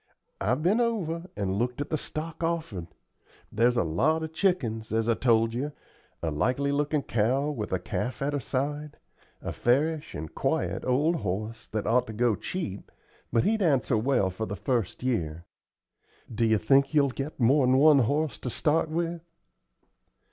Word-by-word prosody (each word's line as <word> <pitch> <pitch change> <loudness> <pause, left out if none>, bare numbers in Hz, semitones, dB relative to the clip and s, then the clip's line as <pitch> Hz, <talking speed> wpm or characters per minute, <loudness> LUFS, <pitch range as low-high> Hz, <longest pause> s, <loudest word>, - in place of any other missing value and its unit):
I've 120 +9 0
been 205 +7 +3
over 180 -8 -1
and 100 -1 -1
looked 125 +2 -1
at 145 - -4
the - - +2
stock 160 +3 -5
offered. 160 - -2 0.6
There's 120 +2 +2
a - - +3
lot 135 - +1
of 160 0 -6
chickens, 135 - 0
as 110 0 +1
I 115 - +4
told 115 -1 +2
you; 140 +5 -3 0.5
a 80 - 0
likely 130 - 0
looking 145 0 0
cow 130 +7 +1
with 110 -8 -4
a 95 - +2
calf 125 +6 -3
at 145 +1 -1
her 145 - 0
side; 145 +4 -3 0.5
a - - -3
fairish 150 +5 +1
and 75 +1 -6
quiet - - -1
old 150 +7 +2
horse 105 - -4
that 110 -2 -3
ought 125 +3 +2
to 110 - -6
go 115 0 +2
cheap, 100 - -5 0.4
but 115 - +3
he'd 220 0 +1
answer 135 - +2
well 110 -4 +2
the 100 +1 -4
first 120 +1 -2
year. 85 -10 -2 0.9
Do 115 +1 +1
you 110 -1 +4
think 135 +8 +3
you'll 140 -2 +4
get 135 +4 -5
more'n 130 +1 +4
one 150 0 +7
horse 145 +5 0
to 125 - -4
start 155 +5 +1
with?" 170 +1 -2
130 Hz, 170 wpm, -27 LUFS, 110-155 Hz, 0.9 s, one